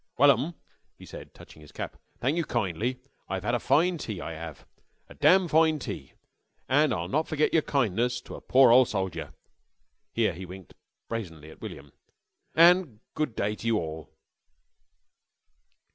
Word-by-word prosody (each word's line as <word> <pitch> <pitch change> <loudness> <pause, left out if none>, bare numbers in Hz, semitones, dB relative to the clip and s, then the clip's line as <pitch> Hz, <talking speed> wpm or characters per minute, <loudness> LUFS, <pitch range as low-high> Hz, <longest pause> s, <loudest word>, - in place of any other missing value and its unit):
"Well 140 +2 +7
'm," 140 +7 -1 0.4
he - - -13
said, - - -11
touching 75 - -15
his 75 - -15
cap. - - -6 0.2
"Thank 135 +5 0
you 170 - 0
kindly. 120 - -2 0.3
I've 95 0 -3
'ad 120 - 0
a 120 - +2
fine 165 +7 +2
tea. 105 -9 -5
I 80 - -5
'ave. 80 -2 -8 0.5
A - - -11
dam' 185 -1 +4
fine 160 0 +3
tea. 145 - -7 0.5
An' 145 +2 +3
I'll 85 -1 -2
not 155 - 0
forget 155 0 0
yer 160 - +5
kindness 120 -3 0
to - - -11
a - - -8
pore 130 -2 +5
ole 130 +2 +7
soldier." 95 -5 -4 0.8
Here 110 -5 +1
he 90 +3 -8
winked 95 0 -11 0.3
brazenly 80 -9 -6
at - - -17
William. 70 0 -9 0.6
"An' 170 - +5
good 150 -7 -2
day 105 +1 -1
ter 115 - -6
you 115 -1 +3
orl." 80 -3 -5
120 Hz, 165 wpm, -27 LUFS, 95-150 Hz, 0.8 s, Well